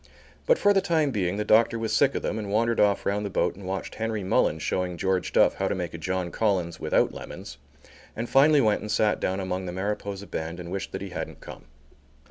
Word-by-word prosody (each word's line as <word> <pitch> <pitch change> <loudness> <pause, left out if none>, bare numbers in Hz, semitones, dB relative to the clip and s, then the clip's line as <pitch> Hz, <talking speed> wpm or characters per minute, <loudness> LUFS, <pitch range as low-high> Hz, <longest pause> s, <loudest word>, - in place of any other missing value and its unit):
But, - - +5
for 205 - +4
the 195 - +3
time 160 -5 +1
being, 95 -4 -1
the 105 - -2
doctor 115 +1 +4
was 110 -1 -2
sick 140 -1 +3
of - - -2
them 110 - -2
and 100 -2 -5
wandered 115 +2 +1
off 100 -1 +3
round 105 +1 0
the 100 - -3
boat 90 - 0
and 95 -1 -10
watched 95 0 -4
Henry 110 -2 -3
Mullins 80 -4 +1
showing 90 +1 -1
George 95 -1 0
Duff - - +4
how 95 - -2
to - - -1
make 90 -3 -4
a 85 - -6
John 90 0 -2
Collins 95 -6 0
without - - +1
lemons, - - -9 0.6
and 115 +2 -3
finally 145 +3 +5
went 105 -3 +2
and 105 - -5
sat 105 -1 +2
down 95 +1 -1
among 95 -1 -3
the - - -3
Mariposa 100 +1 -4
band 85 -1 -5
and 85 0 -7
wished 100 0 -4
that - - -4
he 100 - -6
hadn't 90 - -6
come. - - -11
100 Hz, 235 wpm, -26 LUFS, 90-110 Hz, 0.6 s, But